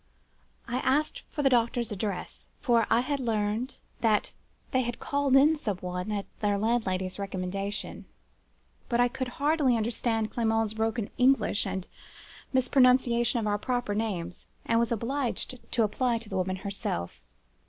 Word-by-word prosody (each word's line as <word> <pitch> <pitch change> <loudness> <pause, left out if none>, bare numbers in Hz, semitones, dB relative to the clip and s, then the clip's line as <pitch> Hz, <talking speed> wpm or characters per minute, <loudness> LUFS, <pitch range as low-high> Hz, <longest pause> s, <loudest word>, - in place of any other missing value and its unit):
I 240 - -1
asked 290 +4 +1
for 295 - -3
the 270 - +5
doctor's 235 -1 +2
address; 200 -2 -4
for 235 -4 +3
I 235 - +4
had 280 +2 -1
heard 225 +1 -1 0.2
that 215 -3 +2 0.4
they 260 - +3
had 240 -1 -3
called 280 -2 +1
in 295 +4 +6
some 215 - -2
one, 180 +2 -4
at 205 -1 -2
their 205 -1 +1
landlady's 200 -4 0
recommendation: 195 +1 -4 0.8
but 240 -1 +1
I 245 - +6
could 255 +1 -4
hardly 280 -1 +2
understand 225 0 -1
Clement's 225 -2 +1
broken 225 0 -1
English, 250 -5 +3
and 190 -1 -4 0.6
mispronunciation 250 -2 +4
of - - -2
our 205 0 +1
proper 245 -2 -1
names, 190 -5 -3 0.2
and 230 0 +3
was 235 0 +1
obliged 250 +2 -2
to 235 - +2
apply 235 +3 +1
to 225 -2 -10
the 195 - -4
woman 185 0 0
herself. 190 - -4
230 Hz, 150 wpm, -28 LUFS, 205-250 Hz, 0.8 s, in